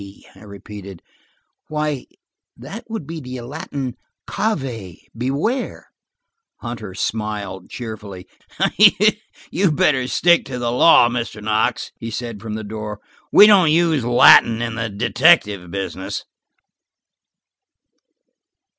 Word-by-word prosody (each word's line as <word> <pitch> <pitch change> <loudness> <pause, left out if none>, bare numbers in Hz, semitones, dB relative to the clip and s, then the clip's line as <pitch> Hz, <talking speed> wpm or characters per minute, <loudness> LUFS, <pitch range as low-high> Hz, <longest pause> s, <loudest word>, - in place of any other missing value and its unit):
I - - -17
repeated. 100 -2 -11 0.6
"Why 150 -3 -3 0.5
that 195 - -9
would 220 -9 -5
be 165 +2 -7
the 125 -3 -7
latin 135 -1 -6 0.3
cave–beware." 135 - -3 0.7
Hunter 115 -6 -7
smiled 105 -3 -4
cheerfully. 105 -6 -8 1.2
"You'd 180 -4 +1
better 130 -3 +2
stick 170 +5 +3
to 135 -2 -6
the 120 -1 -2
law, 125 0 +6
Mr. 120 -2 -4
Knox," 110 0 0
he 115 - -6
said 115 -2 -6
from 110 -1 -6
the 110 - -5
door. 105 0 -6 0.3
"We 205 - +9
don't 195 -6 +6
use 160 -4 +2
Latin 115 -1 +6
in 115 -1 -3
the 115 0 -3
detective 105 - +2
business." 95 0 -5
120 Hz, 105 wpm, -20 LUFS, 105-150 Hz, 1.2 s, We